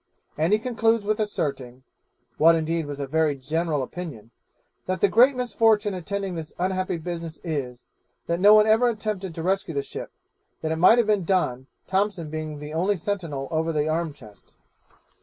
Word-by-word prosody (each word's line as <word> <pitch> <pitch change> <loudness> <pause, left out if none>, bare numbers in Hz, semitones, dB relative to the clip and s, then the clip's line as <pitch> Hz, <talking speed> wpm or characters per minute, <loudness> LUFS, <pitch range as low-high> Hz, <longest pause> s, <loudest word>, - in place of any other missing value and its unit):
And 160 +4 +1
he 210 - +5
concludes 225 -2 +1
with 215 +1 0
asserting 135 - -3 0.6
(what 165 +2 +7
indeed 165 -1 -1
was 145 -1 -6
a 140 - -2
very 155 +1 +1
general 150 +2 -1
opinion), 130 -8 -8 0.6
'that 185 -1 -1
the 200 - +4
great 250 +7 +5
misfortune 225 -3 +2
attending 195 +1 -4
this 160 -2 -7
unhappy 185 0 -1
business 165 -1 -6
is, 135 -7 -4 0.4
that 170 0 -1
no 205 +3 +8
one 215 0 +6
ever 225 +3 +4
attempted 210 -6 -4
to 165 - -5
rescue 190 -3 -1
the 140 - 0
ship; - - -8 0.5
that 160 - -2
it 160 - -1
might 185 +8 +6
have 240 - +3
been 210 -3 +1
done, 135 -9 0 0.2
Thompson 190 -5 -1
being 155 -1 -5
the 150 +1 -8
only 185 +5 +1
sentinel 165 -7 -3
over 160 +1 0
the 150 -1 0
arm 160 0 -1
chest.' 110 -8 -17
170 Hz, 175 wpm, -25 LUFS, 155-205 Hz, 0.6 s, no